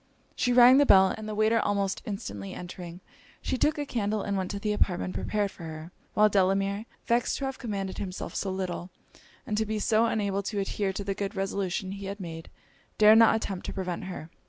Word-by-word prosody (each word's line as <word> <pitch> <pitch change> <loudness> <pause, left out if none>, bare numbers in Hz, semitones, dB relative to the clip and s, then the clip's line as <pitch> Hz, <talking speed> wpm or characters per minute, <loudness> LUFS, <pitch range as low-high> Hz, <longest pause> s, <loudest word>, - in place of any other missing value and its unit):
She 245 - +1
rang 250 +2 +8
the 285 - +5
bell; 190 -1 +6
and 215 -1 -7
the 215 - -4
waiter 215 +2 +3
almost 200 -2 0
instantly 105 - -5
entering, 175 0 -8 0.4
she - - -2
took 300 +4 +1
a 290 - -2
candle 215 -5 -1
and 200 - -2
went 190 -1 -2
to 200 - -3
the 210 +1 -1
apartment 185 -2 0
prepared 205 -2 -1
for - - -15
her: 160 +1 -8 0.2
while 215 0 +6
Delamere, 195 +2 +1 0.2
vexed 235 0 +1
to 275 - -3
have 270 -1 -4
commanded 200 -5 -4
himself 185 -2 -5
so 195 - -2
little, 185 -1 -4 0.6
and 210 - -2
to - - +2
be 215 0 -1
so 220 +2 +2
unable 200 -3 0
to 205 +1 -4
adhere 195 0 -1
to 195 +1 -5
the 195 0 -2
good 200 +1 -4
resolutions 195 0 -2
he 200 - -7
had 200 +1 -5
made, 165 -3 -7 0.5
dared 215 +1 +7
not 230 - +6
attempt 195 -4 -3
to - - -4
prevent 185 -2 -4
her. 165 -3 -7
200 Hz, 210 wpm, -28 LUFS, 190-215 Hz, 0.6 s, rang